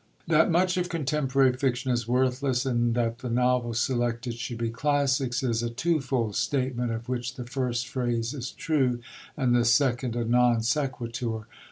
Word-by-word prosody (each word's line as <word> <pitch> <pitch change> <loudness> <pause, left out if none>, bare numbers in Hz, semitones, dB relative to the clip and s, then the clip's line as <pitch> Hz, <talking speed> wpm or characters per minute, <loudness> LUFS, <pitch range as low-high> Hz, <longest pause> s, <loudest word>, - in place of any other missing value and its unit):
That 160 -1 +4
much 180 +2 +2
of 180 0 -1
contemporary 135 -4 +1
fiction 130 0 -1
is 120 -2 -1
worthless, 130 +1 +1
and 120 -2 +1
that 115 -1 0
the 125 - -5
novels 120 -1 +1
selected 120 -1 -1
should 120 +1 -5
be 115 -1 -2
classics, 135 0 0
is 115 -3 0
a 120 - -1
twofold 125 -5 -1
statement, 130 -3 -1
of 115 +1 -5
which 125 +1 -3
the 125 - -6
first 120 -2 -2
phrase 120 -1 -1
is 130 -3 -5
true 130 -6 0 0.4
and 125 -4 +2
the 120 - +4
second 120 0 +2
a 120 -1 -1
non 120 -1 +3
sequitur. 120 -4 -2
125 Hz, 165 wpm, -27 LUFS, 120-135 Hz, 0.4 s, That